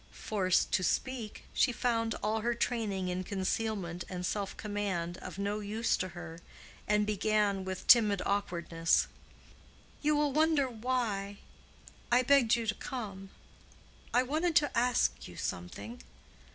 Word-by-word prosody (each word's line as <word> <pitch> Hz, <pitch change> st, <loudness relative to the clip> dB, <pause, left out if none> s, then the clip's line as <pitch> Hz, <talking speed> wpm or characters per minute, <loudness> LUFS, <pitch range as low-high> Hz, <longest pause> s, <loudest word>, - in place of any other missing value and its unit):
Forced 190 Hz, -4 st, 0 dB
to 185 Hz, -, +2 dB
speak, 240 Hz, +2 st, -2 dB
she -, -, +3 dB
found 230 Hz, -2 st, 0 dB
all 215 Hz, +1 st, 0 dB
her 240 Hz, +2 st, 0 dB
training 210 Hz, -6 st, -1 dB
in 180 Hz, +1 st, -2 dB
concealment 190 Hz, -2 st, -2 dB
and 180 Hz, -1 st, -4 dB
self 200 Hz, +1 st, -2 dB
command 195 Hz, -5 st, -3 dB
of -, -, -8 dB
no 200 Hz, +1 st, -1 dB
use 215 Hz, +3 st, 0 dB
to 185 Hz, -, -2 dB
her 170 Hz, -1 st, -8 dB, 0.5 s
and 210 Hz, 0 st, +3 dB
began 210 Hz, -1 st, +1 dB
with 185 Hz, -1 st, -5 dB
timid 215 Hz, -5 st, +6 dB
awkwardness, 170 Hz, -4 st, +1 dB, 1.0 s
"You 300 Hz, 0 st, +2 dB
will 295 Hz, -2 st, +1 dB
wonder 310 Hz, -2 st, +3 dB
why 220 Hz, -5 st, -2 dB, 0.7 s
I 250 Hz, +1 st, +5 dB
begged 255 Hz, -3 st, +5 dB
you 235 Hz, -1 st, -2 dB
to 215 Hz, -, +1 dB
come. 200 Hz, -8 st, -6 dB, 0.8 s
I 250 Hz, -, +4 dB
wanted 315 Hz, +5 st, 0 dB
to 290 Hz, -1 st, +3 dB
ask 245 Hz, +1 st, +1 dB
you -, -, -11 dB
something. 100 Hz, +7 st, -5 dB
210 Hz, 140 wpm, -31 LUFS, 190-240 Hz, 1.0 s, timid